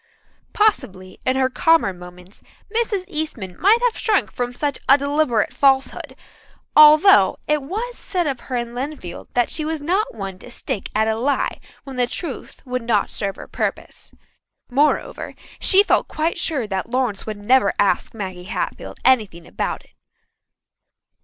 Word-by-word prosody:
Possibly 190 Hz, -, 0 dB
in 255 Hz, -, +2 dB
her 265 Hz, -1 st, +2 dB
calmer 320 Hz, -, +2 dB
moments 180 Hz, +1 st, -14 dB, 0.3 s
Mrs. 440 Hz, -5 st, 0 dB
Eastman 300 Hz, -, -3 dB
might 445 Hz, +6 st, +4 dB
have 485 Hz, -2 st, +2 dB
shrunk 425 Hz, -3 st, +1 dB
from 245 Hz, 0 st, -3 dB
such 285 Hz, +2 st, -3 dB
a 275 Hz, -, +8 dB
deliberate 280 Hz, -6 st, 0 dB
falsehood, 270 Hz, -2 st, +1 dB, 0.6 s
although 305 Hz, +6 st, +7 dB
it 300 Hz, -1 st, +1 dB
was 435 Hz, -, -5 dB
said 360 Hz, -3 st, -2 dB
of 275 Hz, -4 st, -2 dB
her 255 Hz, -, -6 dB
in 235 Hz, -1 st, -3 dB
Lynnfield 255 Hz, -, -6 dB
that 245 Hz, -1 st, +2 dB
she 310 Hz, -, -3 dB
was 315 Hz, 0 st, -3 dB
not 360 Hz, -, -1 dB
one 195 Hz, -3 st, -6 dB
to -, -, -12 dB
stick 225 Hz, -4 st, -5 dB
at 220 Hz, +1 st, +2 dB
a 220 Hz, -, +1 dB
lie 265 Hz, +5 st, -1 dB, 0.2 s
when 270 Hz, -2 st, -9 dB
the 245 Hz, -1 st, +2 dB
truth 290 Hz, +2 st, -7 dB
would 255 Hz, 0 st, -3 dB
not 230 Hz, -3 st, 0 dB
serve 195 Hz, -1 st, -3 dB
her -, -, -10 dB
purpose. -, -, -4 dB, 0.6 s
Moreover, 290 Hz, +4 st, 0 dB, 0.2 s
she 395 Hz, +1 st, +6 dB
felt -, -, +2 dB
quite 320 Hz, +2 st, -2 dB
sure 285 Hz, -8 st, 0 dB
that 195 Hz, +1 st, -4 dB
Lawrence 245 Hz, -5 st, -1 dB
would 215 Hz, -1 st, -4 dB
never 210 Hz, +1 st, +3 dB
ask 200 Hz, -3 st, +1 dB
Maggie 185 Hz, -4 st, -6 dB
Hatfield 210 Hz, -, -5 dB
anything 210 Hz, -10 st, +2 dB
about -, -, -4 dB
it. -, -, -27 dB
260 Hz, 160 wpm, -21 LUFS, 210-310 Hz, 0.6 s, a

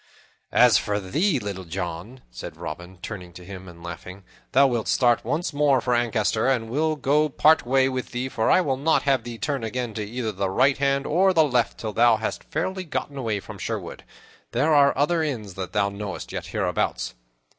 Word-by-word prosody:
"As 125 Hz, -3 st, +6 dB
for 105 Hz, 0 st, -1 dB
thee, 150 Hz, -, +1 dB
Little 100 Hz, -5 st, -5 dB
John," 90 Hz, +7 st, -6 dB
said -, -, -8 dB
Robin, 90 Hz, +4 st, -7 dB
turning 90 Hz, -5 st, -7 dB
to 90 Hz, 0 st, -12 dB
him 95 Hz, 0 st, -9 dB
and 85 Hz, -1 st, -13 dB
laughing, 90 Hz, +3 st, -8 dB, 0.3 s
"thou 140 Hz, +2 st, +6 dB
wilt 120 Hz, -5 st, 0 dB
start 120 Hz, -2 st, +3 dB
once 160 Hz, +1 st, -2 dB
more 145 Hz, -2 st, +3 dB
for 125 Hz, 0 st, 0 dB
Ancaster, 115 Hz, -1 st, +1 dB
and 120 Hz, -4 st, 0 dB
we 140 Hz, -, -1 dB
will 155 Hz, 0 st, +1 dB
go 150 Hz, +2 st, +2 dB
part 155 Hz, -1 st, +4 dB
way 130 Hz, +1 st, +4 dB
with 130 Hz, -1 st, -3 dB
thee, 125 Hz, +1 st, -3 dB
for 110 Hz, -4 st, 0 dB
I -, -, +5 dB
will 135 Hz, -7 st, 0 dB
not 160 Hz, +4 st, +2 dB
have 135 Hz, -4 st, +2 dB
thee 120 Hz, -1 st, -7 dB
turn 140 Hz, -1 st, -2 dB
again 120 Hz, +1 st, -3 dB
to 105 Hz, 0 st, -3 dB
either 110 Hz, +1 st, -3 dB
the 100 Hz, -1 st, -2 dB
right 130 Hz, +7 st, +3 dB
hand 140 Hz, 0 st, +1 dB
or 190 Hz, +4 st, +3 dB
the 160 Hz, -2 st, +5 dB
left 125 Hz, -5 st, +1 dB
till 110 Hz, -2 st, -5 dB
thou 115 Hz, +1 st, +5 dB
hast 110 Hz, -, -4 dB
fairly 185 Hz, +4 st, -3 dB
gotten 150 Hz, -3 st, -4 dB
away 115 Hz, -6 st, -2 dB
from -, -, -10 dB
Sherwood. -, -, -5 dB, 0.5 s
There 145 Hz, +7 st, +2 dB
are 140 Hz, -2 st, +5 dB
other 160 Hz, +4 st, +2 dB
inns 115 Hz, -11 st, -3 dB
that 95 Hz, -1 st, -6 dB
thou 100 Hz, -1 st, +1 dB
knowest 100 Hz, -1 st, -6 dB
yet, -, -, -5 dB
hereabouts." -, -, -1 dB
120 Hz, 205 wpm, -24 LUFS, 100-140 Hz, 0.5 s, As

